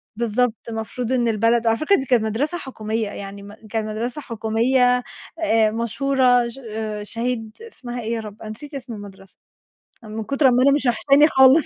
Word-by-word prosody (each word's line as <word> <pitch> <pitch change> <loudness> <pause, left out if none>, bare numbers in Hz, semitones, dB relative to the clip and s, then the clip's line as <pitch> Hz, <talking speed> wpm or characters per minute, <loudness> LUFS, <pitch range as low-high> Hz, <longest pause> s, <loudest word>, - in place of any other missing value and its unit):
بالضبط، 235 +1 +1 0.2
المفروض 225 +2 -4
إن 245 -2 +2
البلد 230 +1 +2
على 225 - +3
فكرة 310 +9 +3
دي 270 - -2
كانت 240 -4 +3
مدرسة 275 +11 -1
حكومية 220 -6 -3
يعني، 200 0 -8
م 205 - -11
كانت 215 0 -4
مدرسة 235 +6 -4
حكومية 245 +2 +1 0.4
آآ، 225 -9 +3
مشهورة 245 +1 +2
ش 235 +3 -9 0.4
شهيد 230 0 -4
اسمها 250 - -7
إيه 225 +1 -3
يا 230 - -1
رب، 210 -1 -9
أنا 215 - -7
نسيت 285 +7 -9
اسم 255 -3 -6
المدرسة 195 -2 -12 0.7
من 215 0 -5
كتر 275 +3 +2
أما 250 0 +4
أنا 280 - +6
مش 280 -1 +1
وحشاني 275 +6 +5
خالص. 265 +1 +6
235 Hz, 175 wpm, -22 LUFS, 220-260 Hz, 0.7 s, أنا